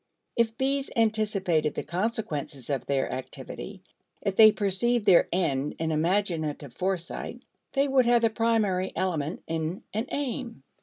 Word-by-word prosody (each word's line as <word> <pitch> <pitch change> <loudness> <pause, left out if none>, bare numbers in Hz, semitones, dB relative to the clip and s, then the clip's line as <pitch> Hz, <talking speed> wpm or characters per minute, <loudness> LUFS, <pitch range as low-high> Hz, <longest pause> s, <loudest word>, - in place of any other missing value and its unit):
If 230 -1 +1
bees 275 +1 0
anticipated 205 -9 +1
the - - -2
consequences 170 - -3
of 135 - -2
their 135 -1 0
activity, 130 - -7 0.4
if 195 - -1
they 215 0 +9
perceived 210 +3 +1
their 175 - +6
end 150 -6 0
in 160 0 -1
imaginative 160 -5 0
foresight, 185 +3 -3 0.3
they 275 +1 +2
would 265 -3 +3
have 240 -1 +4
the 225 - +4
primary 215 -5 +1
element 165 -4 -2
in 165 +2 -3
an 220 +4 -2
aim. 255 - -4
190 Hz, 140 wpm, -27 LUFS, 160-230 Hz, 0.4 s, they